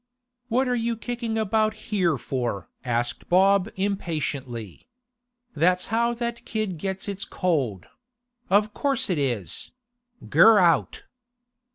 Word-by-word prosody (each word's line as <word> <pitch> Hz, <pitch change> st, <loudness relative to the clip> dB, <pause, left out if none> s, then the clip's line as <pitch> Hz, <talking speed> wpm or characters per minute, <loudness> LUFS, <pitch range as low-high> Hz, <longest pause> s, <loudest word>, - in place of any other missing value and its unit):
'What 255 Hz, +3 st, +1 dB
are 250 Hz, -, +1 dB
you 235 Hz, -1 st, -1 dB
kicking 235 Hz, -1 st, -3 dB
about 215 Hz, 0 st, +1 dB
here 190 Hz, -8 st, 0 dB
for?' 120 Hz, -9 st, -3 dB, 0.2 s
asked 120 Hz, -1 st, -2 dB
Bob 195 Hz, +2 st, +4 dB
impatiently. 150 Hz, -, -3 dB, 0.7 s
'That's 180 Hz, +4 st, +2 dB
how 235 Hz, +1 st, +2 dB
that 235 Hz, 0 st, -4 dB
kid 215 Hz, -6 st, -3 dB
gets 190 Hz, +3 st, -4 dB
its 200 Hz, -1 st, -4 dB
cold—of 210 Hz, -, -2 dB
course 265 Hz, -5 st, 0 dB
it 170 Hz, -, 0 dB
is!—Ger 235 Hz, -, +1 dB
out! 175 Hz, -4 st, +2 dB
200 Hz, 105 wpm, -25 LUFS, 155-235 Hz, 0.7 s, Bob